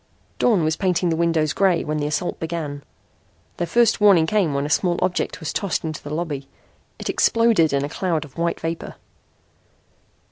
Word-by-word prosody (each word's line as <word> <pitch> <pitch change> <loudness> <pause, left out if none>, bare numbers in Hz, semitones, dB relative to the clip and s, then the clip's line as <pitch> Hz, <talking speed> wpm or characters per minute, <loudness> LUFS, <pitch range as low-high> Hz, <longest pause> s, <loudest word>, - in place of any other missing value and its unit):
Dawn 215 -9 +3
was 155 +1 0
painting 180 -2 +1
the 165 - +1
windows 160 -2 +1
gray 190 -4 +2
when 155 0 -2
the 145 -1 -1
assault 150 +4 -2
began. 160 -4 -4 0.7
Their 175 - -2
first 230 +3 +3
warning 195 -6 +6
came 190 -2 +1
when 140 +1 0
a - - -4
small 175 +1 +2
object 185 0 -1
was 160 -3 -4
tossed 200 -3 -1
into 155 -2 -5
the 145 - -8
lobby. 150 -3 -4 0.5
It - - -6
exploded 230 -9 +3
in 140 0 0
a - - -3
cloud 165 -1 -1
of 140 - -17
white 170 0 -1
vapor. 165 +1 -5
165 Hz, 180 wpm, -22 LUFS, 155-185 Hz, 0.7 s, warning